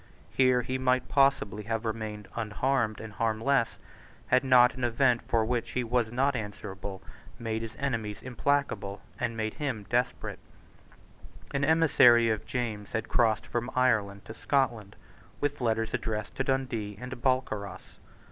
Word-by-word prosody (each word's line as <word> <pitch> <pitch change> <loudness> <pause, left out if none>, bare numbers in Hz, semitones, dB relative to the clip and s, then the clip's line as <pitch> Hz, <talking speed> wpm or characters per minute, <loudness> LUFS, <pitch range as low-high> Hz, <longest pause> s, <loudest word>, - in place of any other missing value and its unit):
Here 130 -2 +3
he 130 +2 -2
might 130 0 +1
possibly 135 -7 +2
have 115 +1 -2
remained 110 -2 -4
unharmed 115 +1 0
and 110 -1 -8
harmless, 115 +3 +1 0.5
had 130 +1 +4
not 125 -2 +6
an 130 - -6
event 120 0 +3
for 115 -2 +1
which 120 0 -2
he 125 - 0
was 120 -1 0
not 135 +3 +1
answerable 100 -3 -6 0.3
made 110 -1 -3
his 115 0 -6
enemies 115 -7 -3
implacable, 130 -6 -1 0.2
and 115 -2 -2
made 110 -1 -2
him 130 -9 -3
desperate, 125 +1 -1 1.1
An 140 0 0
emissary 135 -7 +5
of 110 0 -3
James 110 -4 -3
had 110 0 -2
crossed 110 -2 +2
from 120 0 -3
Ireland 110 -6 +1
to - - -8
Scotland 120 -5 0 0.4
with 145 -1 -2
letters 115 -1 0
addressed 105 -1 -3
to 135 - +1
Dundee 125 -7 -2
and 125 +1 -7
Balcarras. 105 -8 -2
115 Hz, 145 wpm, -29 LUFS, 110-130 Hz, 1.1 s, not